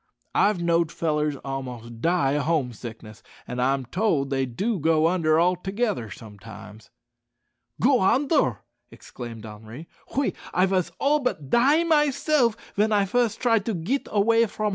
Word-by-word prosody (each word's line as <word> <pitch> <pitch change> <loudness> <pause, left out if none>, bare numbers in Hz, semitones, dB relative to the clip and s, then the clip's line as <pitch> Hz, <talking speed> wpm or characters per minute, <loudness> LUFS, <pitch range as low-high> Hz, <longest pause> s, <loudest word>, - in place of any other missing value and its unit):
I've 205 -3 +2
knowed 170 -1 +2
fellers 150 -2 -1
a'most 125 -4 -6
die 165 -4 +2
o' - - +1
home 145 -4 0
sickness, 110 -1 -10 0.3
an' 125 - -5
I'm 135 +1 +1
told 145 - 0
they 135 -1 0
do 200 - -2
go 160 +1 +3
under 165 -3 +2
altogether 185 - 0
sometimes." 105 0 -12 0.9
"Go 255 +1 +4
onder!" 270 - +2 0.3
exclaimed 115 -3 -10
Henri; 110 +8 -10 0.3
"oui, 280 - +1 0.2
I 185 - +4
vas 185 -3 0
all 295 +2 +2
but 155 - -3
die 280 +7 +4
myself 295 -6 +2 0.2
ven 215 +2 +2
I 205 -2 +3
fust 235 +2 0
try 230 -3 +3
to 210 +1 -3
git 205 +12 -2
away 225 +2 +3
from 215 - -7
hom'. - - +2
170 Hz, 150 wpm, -24 LUFS, -, 0.9 s, Go